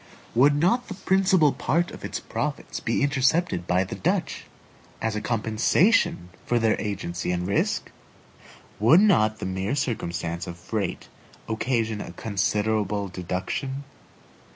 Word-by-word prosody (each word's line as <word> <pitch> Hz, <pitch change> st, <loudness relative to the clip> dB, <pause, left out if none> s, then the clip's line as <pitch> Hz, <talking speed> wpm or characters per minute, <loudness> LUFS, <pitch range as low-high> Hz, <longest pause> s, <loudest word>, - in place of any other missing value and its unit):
Would 140 Hz, +5 st, +5 dB
not 185 Hz, +12 st, +2 dB
the 195 Hz, -, -6 dB
principal 185 Hz, -6 st, +3 dB
part 170 Hz, +7 st, 0 dB
of -, -, -11 dB
its -, -, -4 dB
profits -, -, -4 dB
be -, -, 0 dB
intercepted 140 Hz, -, +1 dB
by 90 Hz, +1 st, +2 dB
the 95 Hz, -, -7 dB
Dutch, -, -, -1 dB, 0.5 s
as 110 Hz, -1 st, -1 dB
a 105 Hz, -, -2 dB
compensation 110 Hz, -, +2 dB
for 120 Hz, -, +1 dB
their 115 Hz, -2 st, +3 dB
agency 90 Hz, -4 st, -3 dB
and 90 Hz, 0 st, -1 dB
risk? 100 Hz, -, 0 dB, 0.9 s
Would 120 Hz, -, +6 dB
not 110 Hz, -, +4 dB
the -, -, -5 dB
mere 95 Hz, +6 st, -2 dB
circumstance 85 Hz, -10 st, -3 dB
of 85 Hz, -, -7 dB
freight 100 Hz, +4 st, -3 dB, 0.4 s
occasion 115 Hz, -1 st, -1 dB
a -, -, -8 dB
considerable 105 Hz, 0 st, -1 dB
deduction? 95 Hz, +10 st, -4 dB
110 Hz, 130 wpm, -25 LUFS, 95-140 Hz, 0.9 s, Would